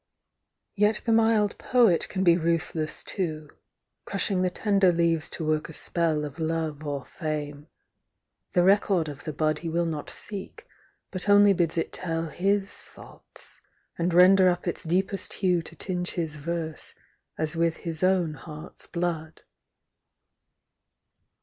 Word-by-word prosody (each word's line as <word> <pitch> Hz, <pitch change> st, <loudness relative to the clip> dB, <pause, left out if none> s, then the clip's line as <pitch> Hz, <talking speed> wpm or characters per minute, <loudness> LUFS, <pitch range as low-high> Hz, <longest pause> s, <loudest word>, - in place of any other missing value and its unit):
Yet 210 Hz, +1 st, +2 dB
the 230 Hz, -, +1 dB
mild 220 Hz, -2 st, +3 dB
Poet 235 Hz, -9 st, +3 dB
can 190 Hz, -1 st, -1 dB
be 170 Hz, -2 st, +6 dB
ruthless 165 Hz, -2 st, -1 dB
too, 155 Hz, -6 st, -4 dB, 0.5 s
Crushing 195 Hz, -1 st, -1 dB
the 185 Hz, -, +2 dB
tender 195 Hz, -1 st, +3 dB
leaves 165 Hz, -2 st, +1 dB
to 160 Hz, -, -4 dB
work 155 Hz, 0 st, 0 dB
a -, -, -8 dB
spell 160 Hz, -2 st, 0 dB
Of 145 Hz, +2 st, -9 dB
love 160 Hz, -2 st, -2 dB
or 145 Hz, -3 st, -4 dB
fame; 150 Hz, -2 st, -5 dB, 0.9 s
the 180 Hz, -, +4 dB
record 195 Hz, -3 st, +3 dB
of 145 Hz, -1 st, -8 dB
the 155 Hz, -, -2 dB
bud 155 Hz, +1 st, 0 dB
He 170 Hz, -, -4 dB
will 170 Hz, +1 st, 0 dB
not 155 Hz, -3 st, -4 dB
seek, 210 Hz, -, -7 dB, 0.5 s
but 185 Hz, +1 st, -1 dB
only 205 Hz, 0 st, +7 dB
bids 170 Hz, -2 st, 0 dB
it 165 Hz, -, -1 dB
tell 165 Hz, -2 st, -2 dB
His 195 Hz, +4 st, 0 dB
thoughts, -, -, -10 dB, 0.3 s
and 175 Hz, +1 st, 0 dB
render 185 Hz, +2 st, +7 dB
up 175 Hz, 0 st, -2 dB
its 175 Hz, -, -2 dB
deepest 190 Hz, +4 st, -1 dB
hue 180 Hz, -3 st, +1 dB
To -, -, -9 dB
tinge 180 Hz, -2 st, -2 dB
his 160 Hz, -3 st, -3 dB
verse 160 Hz, +1 st, -4 dB, 0.4 s
as 155 Hz, +1 st, -1 dB
with 165 Hz, -1 st, +1 dB
his 165 Hz, -2 st, -3 dB
own 185 Hz, -4 st, +2 dB
heart's 150 Hz, +1 st, -10 dB
l)lood. 170 Hz, -2 st, -3 dB
170 Hz, 145 wpm, -26 LUFS, 155-190 Hz, 0.9 s, only